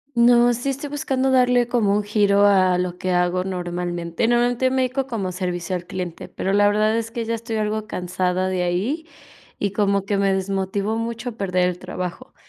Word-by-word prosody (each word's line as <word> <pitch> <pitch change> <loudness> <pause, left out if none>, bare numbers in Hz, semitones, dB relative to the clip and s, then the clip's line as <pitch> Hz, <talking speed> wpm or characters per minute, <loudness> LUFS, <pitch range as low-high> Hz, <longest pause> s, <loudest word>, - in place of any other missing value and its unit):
No, 240 0 +5
sí 245 +4 -2
estoy 275 +2 -4
buscando 270 -2 0
darle 250 -2 +3
como 220 -5 +2
un 210 - +1
giro 205 -1 +3
a 185 -2 +4
lo 180 -1 -2
que 185 0 -2
hago 180 +1 +1
normalmente. 175 0 -2
Normalmente 240 +2 +2
me 260 0 +1
dedico 260 +1 -1
como 205 -8 -3
servicio 180 -1 -3
al 175 -1 -7
cliente, 180 -2 -6
pero 195 - -3
la 205 0 +4
verdad 215 +2 +2
es 230 0 -2
que 235 -1 -4
ya 230 - -2
estoy 230 0 -4
algo 215 0 -1
cansada 180 -1 -1
de 185 -1 -1
ahí 215 - -1 0.5
y 200 -1 -1
como 200 -1 +1
que 205 - 0
me 195 0 +2
desmotivó 195 +2 -1
mucho 230 +1 -4
perder 185 -3 +1
el 180 -1 -4
trabajo. 180 -1 -6
205 Hz, 190 wpm, -22 LUFS, 185-235 Hz, 0.5 s, No